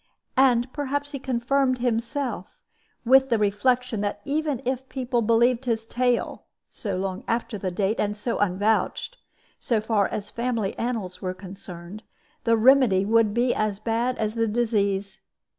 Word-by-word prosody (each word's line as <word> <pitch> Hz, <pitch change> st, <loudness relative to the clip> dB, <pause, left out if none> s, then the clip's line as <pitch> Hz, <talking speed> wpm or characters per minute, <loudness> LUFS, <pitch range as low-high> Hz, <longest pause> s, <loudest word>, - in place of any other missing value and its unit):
And 250 Hz, -1 st, +3 dB
perhaps 285 Hz, 0 st, -2 dB
he 280 Hz, -, -5 dB
confirmed 255 Hz, +1 st, +1 dB
himself 240 Hz, -2 st, -2 dB, 0.5 s
with 265 Hz, +2 st, +5 dB
the 230 Hz, -, +3 dB
reflection 220 Hz, +2 st, +1 dB
that 205 Hz, -1 st, -2 dB
even 295 Hz, -2 st, -1 dB
if 260 Hz, +1 st, -2 dB
people 250 Hz, -2 st, -1 dB
believed 235 Hz, +3 st, +3 dB
his 225 Hz, -2 st, -1 dB
tale 245 Hz, +1 st, -1 dB, 0.3 s
(so 200 Hz, -4 st, -4 dB
long 190 Hz, +3 st, -3 dB
after 230 Hz, -2 st, -2 dB
date 195 Hz, +3 st, -1 dB
and 210 Hz, 0 st, -1 dB
so 230 Hz, +3 st, -2 dB
unvouched), 205 Hz, +3 st, 0 dB, 0.4 s
so 230 Hz, -3 st, +1 dB
far 215 Hz, -2 st, +1 dB
as 210 Hz, 0 st, -5 dB
family 230 Hz, -4 st, -2 dB
annals 225 Hz, -7 st, -3 dB
were 185 Hz, -1 st, -3 dB
concerned, 185 Hz, 0 st, -9 dB, 0.4 s
the 230 Hz, -1 st, +4 dB
remedy 230 Hz, -5 st, +5 dB
would 225 Hz, 0 st, +3 dB
be 240 Hz, +3 st, +2 dB
as 215 Hz, -2 st, -1 dB
bad 235 Hz, +3 st, -1 dB
as 215 Hz, -1 st, -1 dB
the 230 Hz, 0 st, 0 dB
disease. 205 Hz, -3 st, 0 dB
230 Hz, 145 wpm, -25 LUFS, 205-250 Hz, 0.5 s, with